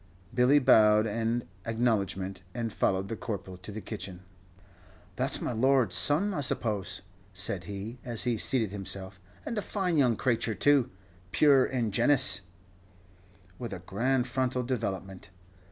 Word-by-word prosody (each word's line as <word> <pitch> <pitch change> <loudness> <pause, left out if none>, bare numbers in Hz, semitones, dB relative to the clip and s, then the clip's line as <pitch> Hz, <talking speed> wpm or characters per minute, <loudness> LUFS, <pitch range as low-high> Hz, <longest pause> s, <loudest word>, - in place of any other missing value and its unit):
Billy 125 +4 +4
bowed 110 -5 +5
an 115 +2 -2 0.2
acknowledgment, 100 -5 -1
and 115 -3 -3
followed 95 0 0
the 115 - -4
Corporal 100 -4 -6
to 90 +3 -8
the 110 +2 -7
kitchen. 95 -5 -7 0.9
"That's 130 +5 +1
my - - -2
lord's 125 -3 +2
son, 165 - +2
I 150 - -3
suppose," 105 -8 -1 0.3
said 90 -1 +1
he, 105 +5 -7
as 120 -3 0
he 120 -1 0
seated 110 -1 +4
himself, 95 -1 -3 0.3
"and 230 - -3
a - - -3
fine 185 -6 -1
young 125 -4 +3
crayture 115 -2 -1
too 135 +3 +3 0.4
puer 140 -1 +5
ingenuus, 120 -3 +2 1.2
with 120 -4 -5
a - - -6
grand 125 +6 0
frontal 130 0 -1
development." 95 -6 -4
115 Hz, 135 wpm, -28 LUFS, 100-130 Hz, 1.2 s, bowed